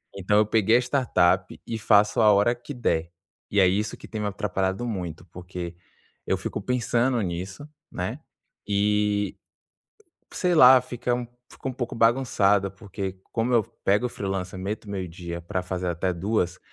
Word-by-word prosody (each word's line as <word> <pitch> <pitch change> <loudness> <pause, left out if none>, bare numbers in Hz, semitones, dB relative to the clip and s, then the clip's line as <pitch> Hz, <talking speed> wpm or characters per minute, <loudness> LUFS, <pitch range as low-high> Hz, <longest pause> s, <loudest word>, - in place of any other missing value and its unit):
Então, 100 +2 +1
eu 105 - +4
peguei 110 +1 +4
a - - +3
startup 95 -9 +1
e 115 - -3
faço 105 0 +4
a 105 -1 +7
hora 105 +5 +3
que 120 +4 -9
der. 85 -9 -1 0.4
E 100 - +2
é 95 - +7
isso 105 +3 -1
que - - -12
tem 110 -2 -5
me 105 - -1
atrapalhado 95 +1 -2
muito 90 -7 -5
porque 90 0 -7 0.5
eu - - +1
fico - - -4
pensando 125 0 +1
nisso, 95 - -5 0.2
né. - - -4 0.5
E, 105 0 +1 1.0
sei 180 -1 +1
lá, 130 -3 +9
fica 120 0 -2
um 120 -1 -3 0.3
fica 135 - -6
um - - -3
pouco 120 -1 -4
bagunçada 110 -5 +3
porque 95 -1 -6
como 120 +2 0
eu 115 - +5 0.2
pego 105 +5 +3
o - - -2
freelancer, 95 -2 -4
meto 100 +2 -5
meio 95 -3 -3
dia 85 0 -7
pra 90 +1 -3
fazer 90 -1 -3
até 85 +2 -1
14h, 90 0 -1
100 Hz, 170 wpm, -25 LUFS, 95-115 Hz, 1.0 s, lá